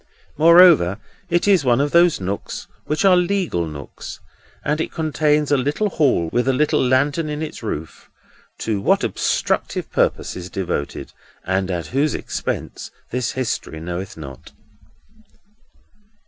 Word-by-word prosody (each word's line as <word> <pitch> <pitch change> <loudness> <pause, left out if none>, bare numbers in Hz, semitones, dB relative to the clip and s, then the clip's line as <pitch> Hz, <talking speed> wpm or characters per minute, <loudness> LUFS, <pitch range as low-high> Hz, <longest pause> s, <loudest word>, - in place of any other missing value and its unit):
Moreover, 165 - +6 0.3
it 175 +2 +1
is 190 -7 +4
one 125 -1 +3
of 145 +1 +1
those 170 -1 +4
nooks 95 +2 -4 0.2
which 155 +6 0
are 190 -2 +7
legal 180 - 0
nooks; 70 -3 -9 0.5
and 150 +1 0
it - - -3
contains 150 -2 +1
a 145 - +4
little 145 +11 0
Hall, 130 - +2
with 120 +1 +1
a 135 - +3
little 150 +1 +2
lantern 140 +5 +1
in 150 +1 -3
its 155 - -7
roof: 80 -8 -6 0.5
to 105 -3 -1
what - - +2
obstructive - - -1
purposes 90 0 -1
devoted, 90 -7 -4 0.3
and 95 +1 0
at 85 -3 -2
whose 145 +3 +1
expense, - - -4 0.2
this 125 -2 -2
history 115 -10 -3
knoweth 90 +3 -6
not. 70 -5 -10
135 Hz, 135 wpm, -21 LUFS, 95-155 Hz, 0.5 s, are